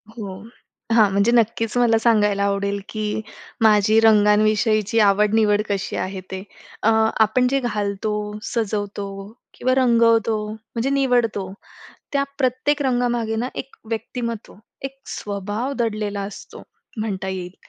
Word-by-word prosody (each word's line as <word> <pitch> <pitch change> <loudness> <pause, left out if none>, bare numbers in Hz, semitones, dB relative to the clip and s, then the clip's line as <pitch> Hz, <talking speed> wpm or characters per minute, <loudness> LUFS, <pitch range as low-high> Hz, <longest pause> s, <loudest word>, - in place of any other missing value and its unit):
हो. 200 -5 -6 0.6
हां, 220 -3 +5
म्हणजे 200 +4 +2
नक्कीच 230 -1 +1
मला 235 -2 +4
सांगायला 210 -3 +2
आवडेल, 200 0 0
की 215 0 -3 0.4
माझी 215 0 +5
रंगांविषयीची 215 0 +3
आवड-निवड 210 +1 +3
कशी 195 -2 -2
आहे, 190 0 -3
ते. 190 0 -5 0.4
अ, 220 - +4 0.3
आपण 250 +4 +2
जे 275 +1 +1
घालतो, 210 -3 -2 0.3
सजवतो 205 -3 -3 0.5
किंवा 255 +1 0
रंगवतो, 230 -3 +3
म्हणजे 230 +3 -4
निवडतो. 245 -8 +1 0.6
त्या 280 -1 +2 0.2
प्रत्येक 265 +3 +1
रंगामागे 240 -4 0
ना, 240 +3 -2
एक 270 - -7
व्यक्तिमत्त्व, 230 0 -4 0.3
एक 270 0 -7 0.2
स्वभाव 205 +6 -3
दडलेला 210 -3 -1
असतो, 195 0 -9 0.4
म्हणता 200 -3 -3
येईल 185 -1 -5
220 Hz, 120 wpm, -22 LUFS, 205-235 Hz, 0.6 s, हां